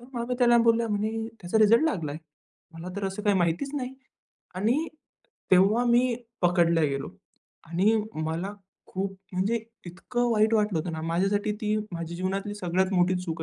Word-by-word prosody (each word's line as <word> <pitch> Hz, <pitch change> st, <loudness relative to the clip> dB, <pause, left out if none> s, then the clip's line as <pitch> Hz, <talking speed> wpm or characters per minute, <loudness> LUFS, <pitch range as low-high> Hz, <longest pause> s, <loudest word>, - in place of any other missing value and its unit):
तर 240 Hz, -, -14 dB
मामी 240 Hz, +1 st, -2 dB
त्यांना 240 Hz, -1 st, +5 dB
बोलल्या 230 Hz, 0 st, +3 dB
म्हणे, 220 Hz, +2 st, -2 dB
"त्याचा 180 Hz, +5 st, 0 dB
रिझल्ट 220 Hz, +5 st, +6 dB
लागला? 165 Hz, -, -1 dB, 0.6 s
मला 165 Hz, +2 st, -7 dB
तर 200 Hz, -, -3 dB
असं 195 Hz, +2 st, -5 dB
काही 205 Hz, -2 st, +3 dB
माहितीच 175 Hz, +11 st, 0 dB
नाही." 260 Hz, -1 st, -4 dB, 0.6 s
आणि 240 Hz, -, +1 dB, 0.6 s
तेव्हा 195 Hz, +6 st, +5 dB
मी 240 Hz, +1 st, +3 dB, 0.3 s
पकडला 170 Hz, -2 st, +3 dB
गेलो 140 Hz, -2 st, -1 dB, 0.6 s
आणि 190 Hz, +7 st, +3 dB, 0.2 s
मला 160 Hz, +5 st, -3 dB, 0.3 s
खूप 195 Hz, 0 st, -4 dB, 0.2 s
म्हणजे 205 Hz, +5 st, 0 dB, 0.3 s
इतकं 240 Hz, +7 st, -2 dB
वाईट 220 Hz, +1 st, +3 dB
वाटलं 210 Hz, -6 st, +2 dB
होतं 165 Hz, +1 st, -3 dB
ना, 160 Hz, 0 st, -5 dB
माझ्यासाठी 195 Hz, +6 st, 0 dB
ती 215 Hz, 0 st, 0 dB, 0.2 s
माझ्या 170 Hz, 0 st, -5 dB
जीवनातली 195 Hz, +3 st, -2 dB
सगळ्यात 185 Hz, 0 st, 0 dB
मोठी 180 Hz, +1 st, +3 dB
चूक 165 Hz, -2 st, -4 dB
195 Hz, 155 wpm, -27 LUFS, 175-225 Hz, 0.6 s, रिझल्ट